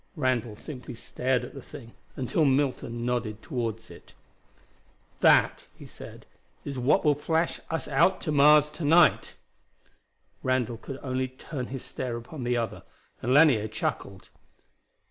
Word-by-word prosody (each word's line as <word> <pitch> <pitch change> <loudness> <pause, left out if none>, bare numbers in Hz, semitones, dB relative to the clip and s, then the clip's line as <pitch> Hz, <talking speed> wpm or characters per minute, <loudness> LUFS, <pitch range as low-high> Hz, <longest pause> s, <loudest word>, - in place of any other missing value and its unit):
Randall 125 -7 -1
simply 125 +1 -9
stared 125 +2 -1
at - - -11
the 135 - -9
thing, 115 -1 -12 0.2
until 130 +5 0
Milton 130 -4 0
nodded 120 -3 -2
toward 115 -6 -4
it. - - -15 1.0
"That," - - +4
he - - -13
said, - - -12 0.4
"is 140 -2 -4
what 125 +5 +2
will 150 - +5
flash 160 +3 -1
us 165 -4 -3
out 140 +7 +3
to 155 - -2
Mars 150 +1 +6
to 155 +2 -8
night." 165 +4 +4 1.1
Randall 125 -3 0
could 135 +4 -8
only 130 -1 -1
turn 130 0 -7
his 130 -1 -7
stare 120 -2 -4
upon 125 +4 -8
the 120 0 0
other, 110 -3 -3 0.4
and 125 - -1
Lanier 135 -7 +5
chuckled. 100 -3 -4
130 Hz, 145 wpm, -27 LUFS, 120-145 Hz, 1.1 s, Mars